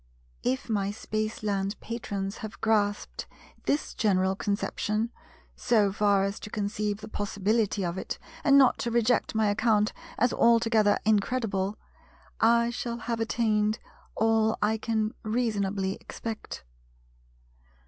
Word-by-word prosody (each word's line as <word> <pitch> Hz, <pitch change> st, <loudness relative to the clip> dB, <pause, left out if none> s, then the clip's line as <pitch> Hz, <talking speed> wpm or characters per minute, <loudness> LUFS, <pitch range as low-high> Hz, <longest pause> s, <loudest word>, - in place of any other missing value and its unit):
If 130 Hz, -, -1 dB
my 200 Hz, -3 st, 0 dB
Spaceland 210 Hz, -1 st, -2 dB
Patrons 200 Hz, -4 st, -4 dB
have 220 Hz, -1 st, -8 dB
grasped 210 Hz, -2 st, 0 dB, 0.4 s
this 290 Hz, -, 0 dB
general 190 Hz, -2 st, +2 dB
conception, 210 Hz, +3 st, -1 dB, 0.4 s
so 215 Hz, -4 st, +2 dB
far 200 Hz, -1 st, +3 dB
as 195 Hz, +1 st, -2 dB
to -, -, -8 dB
conceive 210 Hz, 0 st, -2 dB
the -, -, -7 dB
possibility 205 Hz, 0 st, 0 dB
of 175 Hz, +2 st, -2 dB
it -, -, -4 dB, 0.3 s
and 280 Hz, -2 st, +6 dB
not 265 Hz, -2 st, +5 dB
to 235 Hz, -, -1 dB
reject 235 Hz, 0 st, +1 dB
my 220 Hz, -1 st, +3 dB
account 215 Hz, 0 st, +2 dB, 0.2 s
as 245 Hz, +1 st, +2 dB
altogether 225 Hz, -3 st, +4 dB
incredible—I 220 Hz, +1 st, 0 dB
shall 235 Hz, 0 st, -3 dB
have 230 Hz, 0 st, -3 dB
attained 215 Hz, -2 st, +1 dB, 0.4 s
all 220 Hz, 0 st, +2 dB
I 220 Hz, +1 st, +1 dB
can 220 Hz, -1 st, -1 dB
reasonably 205 Hz, -4 st, 0 dB
expect. 225 Hz, -2 st, -6 dB
215 Hz, 120 wpm, -28 LUFS, 205-230 Hz, 0.4 s, and